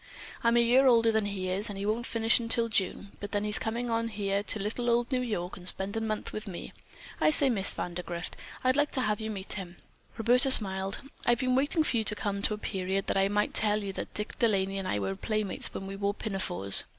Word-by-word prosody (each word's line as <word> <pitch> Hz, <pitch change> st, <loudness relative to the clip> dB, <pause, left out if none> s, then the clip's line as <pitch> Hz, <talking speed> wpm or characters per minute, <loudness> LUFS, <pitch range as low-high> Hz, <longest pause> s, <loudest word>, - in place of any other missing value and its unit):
I'm 235 Hz, 0 st, +4 dB
a 235 Hz, -, +5 dB
year 255 Hz, +3 st, +5 dB
older 230 Hz, -2 st, +5 dB
than 220 Hz, -2 st, +1 dB
he 190 Hz, -2 st, -3 dB
is, 200 Hz, +4 st, -1 dB
and 200 Hz, -, -6 dB
he 200 Hz, -, -4 dB
won't 220 Hz, +3 st, -1 dB
finish 230 Hz, +1 st, +3 dB
until 230 Hz, 0 st, +1 dB
June, 200 Hz, -1 st, -1 dB
then 205 Hz, 0 st, -2 dB
he's 210 Hz, 0 st, 0 dB
coming 235 Hz, +2 st, -2 dB
on 230 Hz, 0 st, 0 dB
here 200 Hz, -2 st, -1 dB
to 210 Hz, -, -2 dB
little 220 Hz, +4 st, -2 dB
old 240 Hz, +1 st, +1 dB
New 255 Hz, -1 st, +1 dB
York 200 Hz, -7 st, -3 dB
and 180 Hz, -1 st, -8 dB
spend 195 Hz, +3 st, 0 dB
a 225 Hz, -, -1 dB
month 215 Hz, -1 st, -3 dB
with 215 Hz, +1 st, -5 dB
me. 180 Hz, -3 st, -7 dB, 0.5 s
I -, -, +4 dB
say, 285 Hz, -3 st, +3 dB
Miss 195 Hz, -5 st, +1 dB
Vandergrift, 175 Hz, 0 st, -4 dB, 0.3 s
I'd 255 Hz, 0 st, +3 dB
like 290 Hz, 0 st, +2 dB
to 260 Hz, -, +1 dB
have 210 Hz, -2 st, 0 dB
you 220 Hz, -, -3 dB
meet 195 Hz, -3 st, -3 dB
him." 180 Hz, -3 st, -6 dB, 0.4 s
Roberta 245 Hz, +4 st, +5 dB
smiled. 195 Hz, -5 st, +3 dB, 0.3 s
"I've 240 Hz, 0 st, +5 dB
been 255 Hz, 0 st, 0 dB
waiting 290 Hz, +5 st, +2 dB
for 255 Hz, -, 0 dB
you 220 Hz, -, +1 dB
to 210 Hz, -, +3 dB
come 200 Hz, -1 st, -2 dB
to 210 Hz, -, +1 dB
a -, -, -10 dB
period 195 Hz, -1 st, -2 dB
that -, -, 0 dB
I 195 Hz, 0 st, +3 dB
might 205 Hz, +1 st, 0 dB
tell 210 Hz, -1 st, +1 dB
you 195 Hz, -1 st, -4 dB
that -, -, -6 dB
Dick 210 Hz, +1 st, -5 dB
De 235 Hz, -, +4 dB
Laney 195 Hz, -2 st, 0 dB
and 190 Hz, -, -4 dB
I -, -, 0 dB
were 95 Hz, -1 st, -2 dB
playmates 215 Hz, -, -2 dB
when 195 Hz, -, -6 dB
we 195 Hz, 0 st, -6 dB
wore 200 Hz, +1 st, -1 dB
pinafores. 185 Hz, -, +2 dB
210 Hz, 245 wpm, -29 LUFS, 195-235 Hz, 0.5 s, a